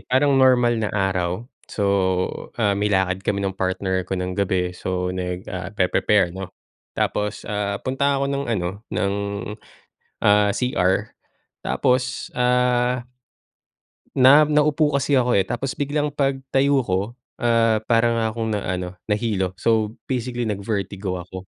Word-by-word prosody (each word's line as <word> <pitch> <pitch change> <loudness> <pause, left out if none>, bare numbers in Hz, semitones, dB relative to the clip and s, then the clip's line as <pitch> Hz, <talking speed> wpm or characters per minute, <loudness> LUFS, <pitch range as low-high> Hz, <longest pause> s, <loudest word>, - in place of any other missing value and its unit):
parang 140 +2 +4
normal 125 -3 +4
na 105 - -1
araw, 95 +1 -1 0.2
so, 105 - -2 0.7
ah, 100 -3 +2
may 105 +1 0
lakad 95 -1 +1
kami 100 0 -1
ng 95 - -3
partner 95 0 -1
ko 90 +1 -4
ng 90 0 -3
gabi, 90 -2 0
so, 90 0 -3
nag 90 0 -4
ah, 95 0 -5
pe-pre-prepare, 95 -2 +2
'no? 95 0 -6 0.5
Tapos, 105 0 -1
ah, 100 -1 -2
punta 140 +2 0
ako 140 - 0
ng 140 0 -2
ano, 90 -6 0 0.2
ng, 100 0 0 1.1
ah, 105 0 +4
CR 100 -3 0 0.5
tapos, 125 +1 0
ah, 125 0 +2 1.2
na 135 +3 +8
naupo 150 0 +3
kasi 140 +1 0
ako, 125 -3 +3
eh, 95 - +1
tapos 135 -1 -3
biglang 145 +1 0
pagtayo 135 0 +1
ko, 95 -4 0 0.4
ah, 115 -2 +3
para 115 0 +3
nga 115 - +1
akong 115 -1 -2
na, 105 -2 -1
ano, 90 0 -3
nahilo. 105 -4 0
So, 110 -2 +2 0.2
basically, 120 -1 -2
nag-vertigo 100 -2 -3
ako, 95 +1 -9
105 Hz, 140 wpm, -22 LUFS, 95-125 Hz, 1.2 s, na